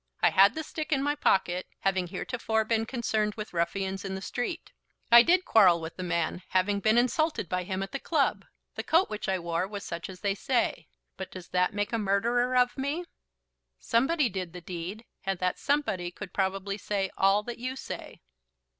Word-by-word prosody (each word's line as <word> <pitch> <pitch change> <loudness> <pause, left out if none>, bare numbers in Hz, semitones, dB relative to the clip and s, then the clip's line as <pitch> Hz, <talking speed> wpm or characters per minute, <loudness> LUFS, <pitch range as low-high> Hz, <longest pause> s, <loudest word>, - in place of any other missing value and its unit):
I - - +4
had 195 +1 +6
the 315 - -3
stick 310 +1 -5
in 275 -2 +2
my 290 +1 +1
pocket, 185 -10 +1
having 190 -2 +1
heretofore 220 +3 -1
been 225 0 0
concerned 220 -4 -1
with 215 -3 -7
ruffians 190 +3 -1
in 195 -1 -4
the 190 - -5
street. 285 +8 -4 0.4
I 235 0 +11
did 360 +7 +3
quarrel 185 -6 +6
with 160 0 -7
the - - -6
man, 170 0 -1
having 195 +2 +2
been 215 +3 +3
insulted 300 - +1
by 180 +1 -2
him 190 0 -2
at 195 - -7
the 275 - -3
club. 300 -2 +1 0.3
The - - -4
coat 335 +4 +2
which 210 -1 -3
I 190 - +2
wore 170 +1 -2
was 200 0 -6
such 170 +1 -5
as 185 -1 -10
they 200 -1 +1
say. 240 +4 -1 0.3
But 190 - -6
does 185 -2 -10
that 180 +2 +1
make 205 +2 -1
a 230 - +1
murderer 235 +5 +1
of 250 +2 +2
me?" 290 +6 -2 0.7
"Somebody 270 +5 +2
did 185 -4 -5
the 180 - -8
deed, 180 +6 -6 0.2
and 195 -1 -1
that 180 0 -1
somebody 280 -12 0
could 185 +2 -9
probably 195 +1 -1
say 195 -2 -2
all 195 +2 +3
that 240 +1 -6
you 255 +2 -3
say." - - -8
200 Hz, 200 wpm, -28 LUFS, 185-245 Hz, 0.7 s, I